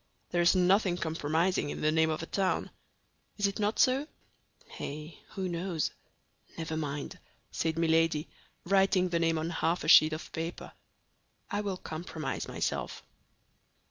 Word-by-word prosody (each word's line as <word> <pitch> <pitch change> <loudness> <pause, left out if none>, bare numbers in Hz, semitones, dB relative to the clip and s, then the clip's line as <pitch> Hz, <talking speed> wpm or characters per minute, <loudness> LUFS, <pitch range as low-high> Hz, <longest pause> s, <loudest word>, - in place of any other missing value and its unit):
There 175 - +2
is 175 +2 +5
nothing 185 0 +3
compromising 160 +1 0
in - - -5
the 155 - +3
name 160 0 +3
of 155 +1 -2
a - - -3
town. 190 +2 -1 0.7
Is 205 - +1
it 200 +2 -1
not 210 +1 0
so?" 265 +3 +3 0.7
"Eh, 150 +3 -5 0.2
who 190 -1 -2
knows? 170 -2 -2 0.7
Never 160 -1 -3
mind," 145 -2 -4 0.3
said 160 0 -1
Milady, 165 -1 +2 0.4
writing 190 -1 +3
the 170 -1 +1
name 165 -1 +2
on 160 +2 -2
half 170 +1 0
a - - -4
sheet 155 0 +8
of 155 - -6
paper; 165 +1 -5 0.8
"I 205 - 0
will 200 -3 -3
compromise 160 -3 -5
myself." - - -3
165 Hz, 145 wpm, -30 LUFS, 160-185 Hz, 0.8 s, sheet